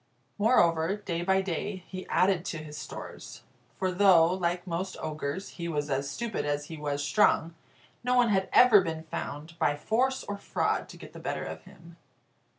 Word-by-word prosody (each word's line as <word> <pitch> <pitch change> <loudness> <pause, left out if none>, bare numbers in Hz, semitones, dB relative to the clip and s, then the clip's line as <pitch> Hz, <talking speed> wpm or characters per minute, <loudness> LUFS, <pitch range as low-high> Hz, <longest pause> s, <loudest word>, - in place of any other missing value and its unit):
Moreover, 175 -6 +3
day 175 -5 -3
by 190 +2 +2
day, 190 +1 -3
he 185 -1 -8
added 185 -2 +2
to 165 - -3
his 155 -1 -8
stores; 150 - -8 0.3
for 185 -1 -1
though 180 -3 +5
(like 175 -1 -1
most 185 +2 -3
ogres) 155 +3 -4
he 170 -1 -6
was 150 -3 -2
as 140 +1 -1
stupid 230 +10 -3
as 145 0 -1
he 160 - -6
was 145 -1 -2
strong, 160 +1 +3 0.5
no 250 +1 +2
one 245 -2 +4
had 190 -2 +1
ever 230 -5 +7
been 160 -3 -4
found, 160 +1 -6
by 145 - +2
force 255 - 0
or 205 - -5
fraud, - - -1
to - - -11
get - - -12
the - - -9
better - - -3
of - - -7
him. 170 0 -16
175 Hz, 180 wpm, -29 LUFS, 155-195 Hz, 0.5 s, ever